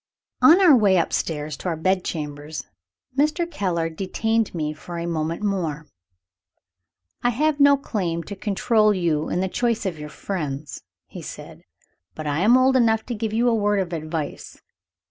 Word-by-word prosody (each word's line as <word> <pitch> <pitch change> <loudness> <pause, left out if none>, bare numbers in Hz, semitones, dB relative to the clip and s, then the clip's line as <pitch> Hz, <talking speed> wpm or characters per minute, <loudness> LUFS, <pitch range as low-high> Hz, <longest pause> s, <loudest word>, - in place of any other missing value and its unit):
On 335 +4 +8
our 355 -7 +7
way 200 -5 +4
upstairs 155 -3 -1
to - - -6
our 165 - -1
bed 185 +3 +1
chambers, 150 -1 -5 0.5
Mr. 305 +5 +2
Keller 185 - -1
detained 205 +6 -1
me 155 -2 -2
for 170 +3 -8
a 170 - -3
moment 165 +2 -2
more. 165 -7 -2 1.4
"I 245 - +2
have 295 +5 +1
no 280 0 +6
claim 180 -11 -3
to 200 - -7
control 215 +2 +2
you 160 -4 0
in 180 - 0
the 190 - 0
choice 230 +2 -1
of 175 -5 -3
your 150 0 -7
friends," 150 -6 -5 0.2
he - - -10
said; - - -9 0.5
"but 155 - -6
I 145 +1 -1
am 225 +7 +5
old 260 +1 +4
enough 225 -3 +3
to 245 - -4
give 220 -1 -3
you 230 +3 +1
a 240 - +3
word 205 -2 +1
of 180 -2 -2
advice. 155 -1 -5
190 Hz, 170 wpm, -23 LUFS, 160-225 Hz, 1.4 s, On